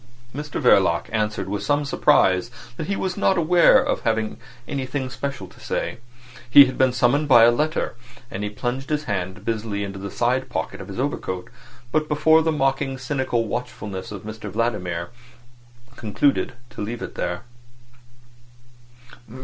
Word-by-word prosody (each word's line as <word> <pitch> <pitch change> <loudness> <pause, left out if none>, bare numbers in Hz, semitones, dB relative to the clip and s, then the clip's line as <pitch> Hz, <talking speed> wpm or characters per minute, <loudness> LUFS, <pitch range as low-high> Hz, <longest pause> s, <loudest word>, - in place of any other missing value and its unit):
Mr 150 +2 -4
Verloc 95 - +4
answered 105 -3 -1
with 100 +1 -3
some 145 +6 +1
surprise 95 -6 +3 0.3
that 155 - -5
he 200 - 0
was 185 -1 -2
not 195 -1 +2
aware 175 +8 +6
of 270 +2 -1
having 110 -2 -1 0.3
anything 130 -1 -3
special 135 -5 -4
to - - -19
say. 115 - -3 0.5
He 140 +3 +10
had 130 0 -4
been 130 -1 +3
summoned 125 +5 +2
by 120 -4 +7
a 120 - +7
letter—And 120 -6 -3
he 105 - -2
plunged 125 +5 -4
his 150 -1 0
hand 95 -1 -4
busily 110 -2 -2
into 100 -1 -6
the 100 +1 -5
side 125 +5 0
pocket 80 -9 -4
of - - -9
his - - -7
overcoat, 90 -1 -3 0.4
but 155 +1 +1
before 160 +2 +4
the 160 0 +1
mocking, 135 -2 0
cynical 130 -3 -1
watchfulness 105 -4 -5
of 100 -3 -7
Mr 110 0 -7
Vladimir, 90 -5 -2 0.9
concluded 125 +5 +1 0.2
to - - -8
leave 115 +3 -4
it - - -6
there. 90 +2 -3
120 Hz, 155 wpm, -23 LUFS, 105-140 Hz, 0.9 s, He